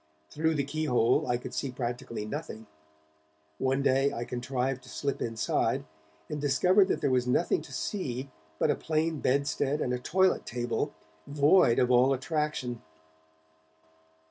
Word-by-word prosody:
Through 160 +1 0
the 140 - +1
key 155 +3 -3
hole 125 -3 +2
I 120 - +1
could 125 - -8
see 140 - -2
practically 120 -3 -4
nothing; 110 -3 -6 0.9
one 135 +1 +1
day 135 +1 +3
I 120 - -4
contrived 125 +1 -2
to 125 - -15
slip 140 +1 -3
inside, 115 -2 0 0.4
and 150 - -4
discovered 185 +7 +4
that - - -1
there 135 - +1
was 125 -1 +1
nothing 125 +7 +2
to - - -13
see 135 - -4 0.3
but - - +2
a - - +1
plain 160 0 -1
bedstead 140 +2 0
and 125 - -1
a 125 - -1
toilet 190 +8 +2
table, 120 0 -2 0.4
void 145 -2 +4
of 125 0 +3
all 125 +2 +5
attraction. 135 -4 -2
135 Hz, 150 wpm, -29 LUFS, 125-150 Hz, 0.9 s, all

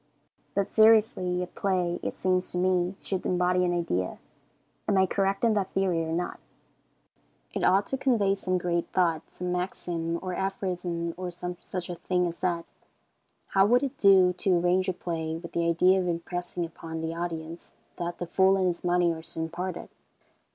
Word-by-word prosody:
But 200 - +2
seriously, 210 -5 +4
a - - -2
play, 180 -1 -1
it - - -3
seems 185 0 0
to - - -2
me, 180 0 +1
should 190 -2 -3
embody 180 0 +2
an 180 - +1
idea. 90 - -1 0.7
Am 200 - +2
I 190 - +5
correct 195 +2 0
in 230 -2 +4
that 200 -3 0
theory 185 -4 +1
or 160 - -4
not? 175 +2 -2 1.1
It - - -2
ought 195 +2 +4
to 270 - -3
convey 220 -8 +2
some 185 -2 -1
great 175 -1 -1
thought, 165 -4 +2
some 180 0 -4
maxim 175 -2 -2
or 185 -1 -3
aphorism, 180 -3 -2
or 180 0 -4
some 180 +1 -5
such 180 -2 -5
a 180 - -4
thing 180 +1 0
as 170 -1 -4
that. 170 -2 -1 0.8
How 195 0 +4
would 245 +4 +4
it 275 - -3
do 190 -2 +6
to 185 -3 +3
arrange 180 +2 +2
a - - 0
play 160 -2 -3
with 170 0 -9
the 170 0 0
idea 180 +3 +4
of 180 - -1
impressing 175 +1 -3
upon 160 0 -7
the 160 0 -3
audience 165 -1 -5 0.3
that 175 0 -3
"the 175 - -4
fool 190 +3 +3
and 190 - +1
his 175 -1 -1
money 175 -1 +2
are 160 - -7
soon 160 0 -3
parted?" 180 +2 -5
180 Hz, 185 wpm, -27 LUFS, 170-190 Hz, 1.1 s, do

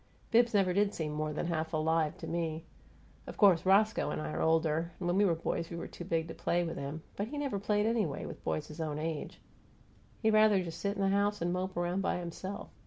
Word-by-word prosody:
Bibbs 235 0 +4
never 190 -3 +3
did 200 +1 +2
seem 155 -2 -2
more 155 0 -2
than 150 - -3
half 160 -1 -2
alive 155 0 +1
to - - -7
me. 165 -1 -2 0.6
Of - - -8
course 185 -4 +5
Roscoe 215 +3 +4
and 75 - -2
I 75 0 -4
are 80 - -2
older, 160 +1 +1
and 180 - -4
when 175 - +1
we 205 +1 +4
were 170 -4 +3
boys 165 +1 -2
we 170 - -5
were - - -5
too 175 - -9
big 165 -1 0
to - - -5
play 175 +1 0
with 165 -1 -4
him, 145 +3 -5
but 205 - -2
he 295 +5 -6
never 275 -8 -1
played 210 +1 +1
anyway, 215 -11 0
with - - -8
boys 150 - -1
his 155 +2 -8
own 150 -2 -2
age. 155 -1 -4 0.8
He'd 220 0 +4
rather 215 -3 +5
just 165 -2 -7
sit 200 0 -1
in 200 - -1
the 195 - +3
house 200 +1 +1
and 175 +1 0
mope 185 0 -3
around 175 +2 0
by - - 0
himself. 180 +3 -6
175 Hz, 240 wpm, -32 LUFS, 160-200 Hz, 0.8 s, course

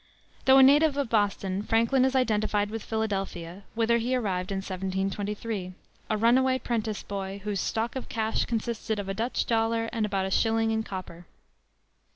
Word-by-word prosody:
Though 265 0 +7
a 265 - +9
native 290 +2 +5
of 280 -4 -1
Boston, 200 -3 +1
Franklin 230 +4 +2
is 265 0 0
identified 215 -4 +1
with 225 0 -4
Philadelphia, 195 -5 -3
whither 235 +1 +2
he 245 +3 0
arrived 190 -6 -1
in - - -1
1723, 195 +1 -3 0.3
a 215 - +1
runaway 255 +4 +4
'prentice 225 -4 -2
boy, 195 0 -5
"whose 205 -2 -2
stock 225 +3 -2
of 260 - -5
cash 220 -2 0
consisted 225 -1 -2
of 200 -1 -4
a 195 - -2
Dutch 230 +5 -1
dollar 225 0 +1
and 225 - 0
about 195 -2 0
a 190 - -3
shilling 225 +2 +2
in 220 0 +1
copper." 185 -4 -8
220 Hz, 170 wpm, -27 LUFS, 195-230 Hz, 0.3 s, a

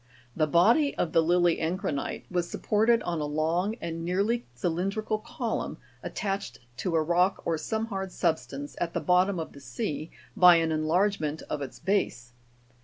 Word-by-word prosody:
The 155 -1 +2
body 230 - +4
of 165 - 0
the 165 - +4
lily 175 +1 +3
encrinite 160 -3 -2
was 175 -1 -1
supported 225 +2 +2
on 170 -2 -2
a - - -1
long 165 +7 0
and 165 0 -4
nearly 200 +7 0
cylindrical 195 - -1
column, - - -3 0.2
attached 195 - -3 0.2
to 175 +1 -1
a 160 - +3
rock 180 +4 +2
or 165 - +1
some 220 +7 -2
hard 195 -4 -4
substance 145 -5 -2
at 170 0 -2
the - - +2
bottom 180 +1 +2
of 160 - -5
the 140 - -12
sea 140 +5 -4 0.3
by 180 -1 +8
an 165 -1 +2
enlargement 160 0 0
of 150 - -2
its 135 - -6
base. 125 -12 -1
175 Hz, 165 wpm, -28 LUFS, 155-195 Hz, 0.3 s, by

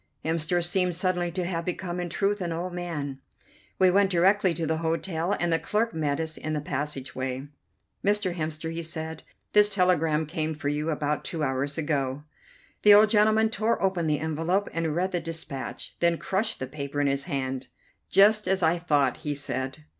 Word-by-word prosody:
Hemster 165 +2 +1
seemed 180 0 +1
suddenly 180 -1 0
to 180 -1 -2
have 170 -2 -2
become 180 0 -3
in 175 -1 -3
truth 200 +4 0
an 175 -2 -2
old 175 +2 -3
man. 150 -6 -4 0.6
We 185 -1 +5
went 195 +1 +4
directly 190 +2 +3
to 165 - -2
the 160 +1 0
hotel, 165 +2 -1
and 175 -1 +1
the 165 - +3
clerk 215 +8 0
met 150 -2 -1
us 160 0 -2
in 155 - -3
the 150 - 0
passage 140 -2 -4
way. 130 +2 -4 0.5
"Mr. 205 -2 +1
Hemster," 160 -1 -3
he 165 +1 -4
said, 160 -1 -4 0.3
"this 210 0 +6
telegram 165 -5 +2
came 155 0 -2
for 145 -1 -2
you 150 +2 -1
about 150 -1 -1
two 160 -3 -3
hours 135 +1 -1
ago." 145 -3 -1 0.6
The 210 -1 +8
old 210 +1 +6
gentleman 220 +1 +4
tore 225 +1 0
open 185 -4 0
the 150 -1 +2
envelope, 165 +5 0
read 165 +3 0
the 175 - 0
dispatch, 165 -5 -6
then 170 -1 +3
crushed 210 +6 -1
the 130 - -4
paper 140 +1 -5
in 145 - +2
his 140 0 0
hand. 130 -1 -3 0.4
"Just 210 +1 +5
as 190 -1 +1
I 165 +2 +3
thought," 145 -6 +2
he 150 -2 -3
said. 135 +1 -4
165 Hz, 185 wpm, -27 LUFS, 150-185 Hz, 0.6 s, The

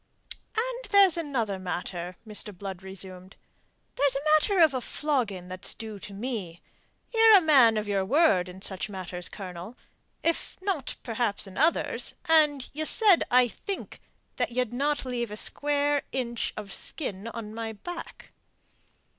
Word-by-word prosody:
"And - - -2
there's 395 -4 +7
another 250 - -2
matter," 180 -1 -4
Mr. 210 -2 -5
Blood 190 -1 -6
resumed. 190 -1 -9 0.6
"There's 280 -1 +2
a 280 +2 -3
matter 395 +5 0
of 320 -4 +6
a 255 - -1
flogging 235 -12 -2
that's 185 +1 -5
due 220 -2 -7
to 200 - -9
me. 200 -6 -5 0.5
Ye're 450 -2 +8
a - - +4
man 265 -9 +6
of 210 0 -2
your 200 -2 +1
word 195 - +3
in 190 +2 -10
such 190 +2 0
matters, 180 -2 -6
Colonel 185 +3 -8 0.5
if 335 0 -1
not 370 -9 -2
perhaps 225 -3 -1
in 190 -1 -11
others 315 +4 +1
and 300 -5 +4
ye 310 +2 -2
said, 405 -1 +5
I 250 0 +5
think, 390 - -6 0.4
that - - 0
ye'd 250 -1 -1
not 285 +3 0
leave 240 -2 -2
a 210 - -6
square 290 +3 +1
inch 235 -3 -2
of 205 -2 -6
skin 210 - -4
on 225 -2 -6
my 225 0 -4
back." 350 - -9
235 Hz, 155 wpm, -27 LUFS, 195-295 Hz, 0.6 s, Ye're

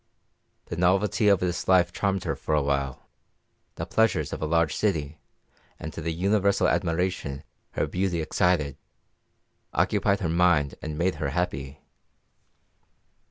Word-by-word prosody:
The 85 - -6
novelty 95 +4 +2
of 100 -2 +4
this 90 -1 -2
life 90 -2 +4
charmed 95 -1 -1
her - - -2
for 75 - -1
a 75 - +2
time; 70 -1 -1 0.8
the - - -4
pleasures 90 -10 +1
of - - -5
a 80 - -1
large 85 0 +2
city, 80 -7 -1 0.6
and 80 -1 -6
the 85 0 -4
universal 100 +4 +2
admiration 85 -5 -1 0.3
her - - 0
beauty 90 -2 -1
excited, 80 -3 +1 1.0
occupied 100 0 +2
her 90 - 0
mind 85 -4 +3
and 75 -1 -5
made 90 +3 +1
her 70 - 0
happy. 70 -4 -3
85 Hz, 135 wpm, -26 LUFS, 75-95 Hz, 1.0 s, of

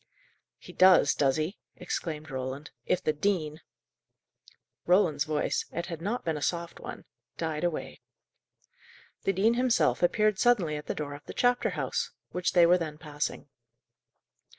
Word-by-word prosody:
"He - - -13
does, 185 -6 +6
does 135 -2 +2
he!" 155 +6 -3 0.2
exclaimed 155 -4 -5
Roland. 130 +3 -5 0.2
"If 185 - +1
the 155 - +1
dean 155 -2 -1 0.6
" - - -31
Roland's 170 -6 +3
voice 155 -1 -1
it 170 - -3
had 165 -3 -6
not 215 +7 -2
been 160 -2 -1
a - - -6
soft 170 +2 -2
one - - -8 0.3
died 160 -1 -3
away. 175 -3 -3 1.2
The 195 - +2
dean 210 +5 +3
himself 240 - +2
appeared 210 +3 +2
suddenly 200 -11 +3
at 150 - -7
the - - -2
door 145 -2 -4
of 145 - -11
the - - -9
chapter 245 0 +2
house, - - -2 0.2
which 180 0 -1
they 175 -2 +7
were 180 +2 +5
then 155 -3 -4
passing. 150 -1 -4
165 Hz, 155 wpm, -29 LUFS, 150-185 Hz, 1.2 s, they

